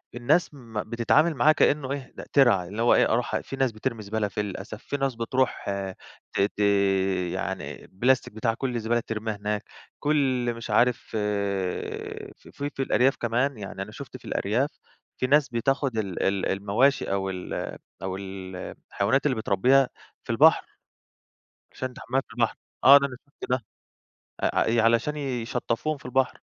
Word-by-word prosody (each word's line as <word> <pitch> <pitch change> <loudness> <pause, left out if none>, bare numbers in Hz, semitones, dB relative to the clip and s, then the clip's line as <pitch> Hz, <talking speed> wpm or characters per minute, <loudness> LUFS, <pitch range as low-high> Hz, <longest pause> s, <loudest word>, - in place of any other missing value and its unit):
الناس 145 +8 +2
م 115 -6 -5
بتتعامل 140 +8 +3
معاه 140 +5 +5
كإنه 145 -3 +2
إيه 140 -2 -5
ده - - -8
ترعة، 120 -10 +5
اللي 105 +5 -5
هو 120 - +5
إيه - - +4
أروح 120 +1 0
في 135 - -7
ناس 135 -3 +1
بترمي 115 +1 -3
زبالة 105 +1 -1
فيه 105 +1 -3
للأسف، 105 +2 -6
في 140 - -3
ناس 135 -2 -1
بتروح 125 +3 0 0.7
ت - - +1
ت 105 +1 0 0.7
يعني 95 +1 -4
بلاستيك 125 +3 +1
بتاع 115 +1 0
كل 125 +1 -3
الزبالة 120 +1 +1
بترميها 110 -1 -3
هناك، 105 +1 -2 0.4
كل 130 -5 +1
مش 115 -1 -8
عارف 120 +3 +4
ف - - -9 1.3
في 145 +1 -5
الأرياف 135 0 +3
كمان، 120 +2 0
يعني 95 -1 -6
أنا 105 - -6
شُفت 130 +2 -9
في - - -19
الأرياف 120 +9 0
إن - - -37 0.3
في 130 - 0
ناس 145 0 +4
بتاخد 130 +1 0
ال 100 -4 -2
ال 95 -1 +1
المواشي 105 +8 +2
أو 95 -1 0
ال 90 -1 -5 0.5
أو 95 0 -3
ال 95 -1 -7 0.4
الحيوانات 130 +9 +1
اللي 130 -5 +2
بتربيها 125 +6 +3 0.3
في - - -23
البحر، - - +5 1.1
عشان 130 -1 -4
تحميها 130 +3 -1
في 115 - -17
البحر، 115 -1 +1 0.3
آه، 140 +2 +10
ده 140 - +2
أنا 125 - -9
شُفت 140 - -10
ده 125 -3 0 0.8
آآ، - - +2
ع - - +3
ي 115 0 +3
علشان 115 +6 +2
يشطفوهم 125 +1 -2
في - - -19
البحر. 130 +1 0
120 Hz, 165 wpm, -26 LUFS, 105-135 Hz, 1.3 s, آه